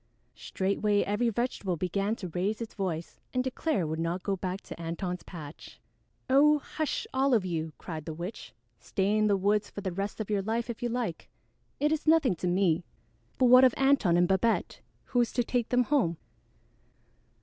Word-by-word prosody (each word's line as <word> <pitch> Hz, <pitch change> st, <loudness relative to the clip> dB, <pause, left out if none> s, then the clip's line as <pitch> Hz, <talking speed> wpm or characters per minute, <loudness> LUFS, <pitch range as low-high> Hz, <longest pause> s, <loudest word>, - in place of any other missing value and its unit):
Straightway 200 Hz, +2 st, 0 dB
every 215 Hz, +4 st, +1 dB
vegetable 215 Hz, -6 st, -2 dB
began 195 Hz, +5 st, -1 dB
to 185 Hz, -6 st, -7 dB
raise 190 Hz, +6 st, -1 dB
its 230 Hz, -1 st, -6 dB
voice 175 Hz, -5 st, -4 dB, 0.2 s
and 255 Hz, -, +2 dB
declare 260 Hz, -, -1 dB
it -, -, -1 dB
would 160 Hz, +1 st, -3 dB
not 170 Hz, +2 st, -2 dB
go 200 Hz, -, 0 dB
back 185 Hz, +1 st, -4 dB
to -, -, -9 dB
Antone's 180 Hz, +2 st, -3 dB
patch. 155 Hz, -4 st, -10 dB, 0.5 s
"Oh, 290 Hz, +3 st, +5 dB
hush, 315 Hz, -, -3 dB
all 265 Hz, -1 st, +3 dB
of 205 Hz, -5 st, +1 dB
you!" 160 Hz, -3 st, -3 dB
cried 155 Hz, -3 st, -7 dB
the 160 Hz, -, -4 dB
witch. 175 Hz, +6 st, -7 dB, 0.3 s
"Stay 200 Hz, +1 st, 0 dB
in 215 Hz, 0 st, +3 dB
the 200 Hz, -1 st, +3 dB
woods 205 Hz, +2 st, +1 dB
for 200 Hz, -, -7 dB
the 190 Hz, -2 st, -3 dB
rest 195 Hz, +4 st, -4 dB
of 215 Hz, -1 st, -4 dB
your 205 Hz, -1 st, +1 dB
life 230 Hz, +4 st, -2 dB
if 230 Hz, -, -10 dB
you 240 Hz, -, -1 dB
like. 230 Hz, -8 st, -3 dB, 0.5 s
It 295 Hz, +1 st, +2 dB
is 315 Hz, 0 st, -1 dB
nothing 310 Hz, -, +5 dB
to 180 Hz, -, -2 dB
me; 175 Hz, -2 st, +2 dB, 0.5 s
but 260 Hz, -, +3 dB
what 250 Hz, +1 st, +8 dB
of 255 Hz, -3 st, +5 dB
Antone 270 Hz, -11 st, +3 dB
and 175 Hz, 0 st, +4 dB
Babette? 195 Hz, +5 st, 0 dB, 0.2 s
Who 245 Hz, -, +1 dB
is 235 Hz, -, 0 dB
to 245 Hz, -, +1 dB
take 240 Hz, -1 st, -1 dB
them 250 Hz, 0 st, +3 dB
home?" 240 Hz, -, +1 dB
205 Hz, 195 wpm, -29 LUFS, 180-245 Hz, 0.5 s, what